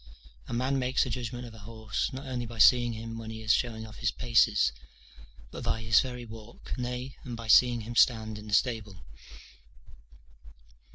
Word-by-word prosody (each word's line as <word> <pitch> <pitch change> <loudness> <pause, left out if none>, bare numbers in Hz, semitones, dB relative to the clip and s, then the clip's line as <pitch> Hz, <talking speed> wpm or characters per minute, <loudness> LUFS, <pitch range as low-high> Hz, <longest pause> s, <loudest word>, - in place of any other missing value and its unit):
A - - -8
man 130 +3 0
makes 130 +1 +1
a 130 - -4
judgment 125 0 -4
of 115 - -11
a 110 - -13
horse, 110 +2 -4
not 135 +1 -7
only 125 -2 -4
by 115 0 -9
seeing 120 +1 +5
him 115 +1 -7
when 110 -1 -7
he 110 0 -7
is 110 0 +4
showing 110 -2 -1
off 110 -2 -12
his 115 - 0
paces, 110 - +3 0.8
but - - -7
by 115 - -1
his 115 0 +5
very 125 -2 -4
walk, 110 0 -10
nay, 125 +1 -5
and 120 -3 -6
by 115 -1 -8
seeing 120 +1 +5
him 120 +2 -7
stand 110 -3 +3
in 105 - -11
the 105 - -6
stable. 105 - -1
115 Hz, 185 wpm, -29 LUFS, 110-125 Hz, 0.8 s, seeing